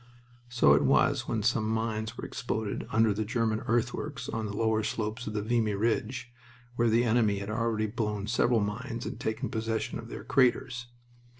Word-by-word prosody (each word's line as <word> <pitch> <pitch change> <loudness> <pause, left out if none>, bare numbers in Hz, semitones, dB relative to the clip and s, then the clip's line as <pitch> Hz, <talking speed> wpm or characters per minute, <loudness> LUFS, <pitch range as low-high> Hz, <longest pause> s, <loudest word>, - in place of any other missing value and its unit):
So 120 - +5
it 75 0 +4
was 70 - +3
when 110 -2 -1
some 110 -1 +1
mines 110 0 -2
were - - -5
exploded 110 -4 -3
under 110 -1 +4
the 110 +2 -1
German 110 -1 0
earthworks 125 +5 -1
on 110 -1 -3
the 100 0 -5
lower 110 -1 +2
slopes 110 +2 -3
of 105 - -3
the 105 - -1
Vimy 110 -2 +1
Ridge, 115 +3 -1 0.4
where 120 -1 +3
the 115 +2 +4
enemy 110 -3 +3
had 100 +1 -4
already 115 -1 0
blown 105 -2 -2
several 120 +1 +2
mines 115 +4 -3
and - - -5
taken 110 +1 -2
possession 110 0 -2
of - - -8
their - - -7
craters. 125 -2 +2
110 Hz, 180 wpm, -29 LUFS, 110-120 Hz, 0.4 s, So